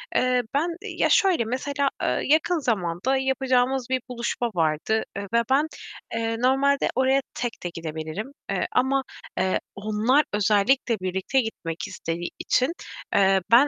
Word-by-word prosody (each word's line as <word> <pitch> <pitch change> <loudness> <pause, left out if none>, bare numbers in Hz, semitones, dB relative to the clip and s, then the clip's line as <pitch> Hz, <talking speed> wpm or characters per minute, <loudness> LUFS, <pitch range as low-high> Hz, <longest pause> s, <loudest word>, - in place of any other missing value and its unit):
eee, 250 0 +3
ben 315 +5 +1
Ya, 430 - -1
şöyle 380 - +4
mesela, 275 +3 -1
eee, - - +1
yakın 315 +4 +3
zamanda 215 - 0
yapacağımız 265 -1 +1
bir 260 -1 +1
buluşma 240 0 -2
vardı. 160 +7 +1
Eee, 200 - -3
ve 235 0 +4
ben, 285 +4 +3 0.5
eee, 225 0 -1
normalde 270 +3 +3
oraya 265 +1 +3
tek 240 -6 -4
de 175 - -2
gidebilirim, 160 - -5 0.2
eee, - - 0
ama, 265 +1 +2 0.3
eee, 185 0 +1 0.2
onlar 215 +8 +2
özellikle 215 +3 +2
birlikte 190 +8 0
gitmek 170 -7 -5
istediği 170 +1 -4
için, 255 +6 +2 0.4
eee, 195 -1 +4
ben 255 +5 +7
245 Hz, 140 wpm, -25 LUFS, 195-270 Hz, 0.5 s, ben